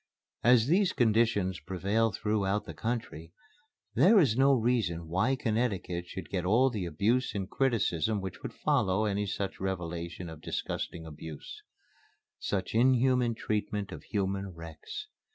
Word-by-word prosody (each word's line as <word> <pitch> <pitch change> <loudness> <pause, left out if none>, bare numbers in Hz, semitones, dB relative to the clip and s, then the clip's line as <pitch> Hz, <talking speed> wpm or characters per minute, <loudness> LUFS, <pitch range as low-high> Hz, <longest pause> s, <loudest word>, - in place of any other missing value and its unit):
As 120 -2 +6
these 185 +6 +3
conditions 110 -5 +2
prevail 100 +5 0
throughout 105 0 0
the - - -7
country, 110 -8 -4 0.6
there 195 - +6
is 135 - +3
no 135 +2 +5
reason 110 -9 0
why 95 +11 +1
Connecticut 105 -8 -1
should 95 -1 -8
get 90 -3 -1
all 120 +8 +4
the 105 -6 -3
abuse 110 +11 +1
and 95 -2 -2
criticism 110 - +1
which 95 -2 -6
would - - -5
follow 95 +3 +1
any 105 0 -1
such 95 0 -3
revelation 85 -2 -4
of 80 -2 -9
disgusting 80 0 -4
abuse; 75 -1 -9 0.8
such 95 -2 -2
inhuman 125 0 +3
treatment 105 -1 -2
of - - -7
human 100 -1 -2
wrecks. 85 - -8
105 Hz, 135 wpm, -30 LUFS, 90-120 Hz, 0.8 s, As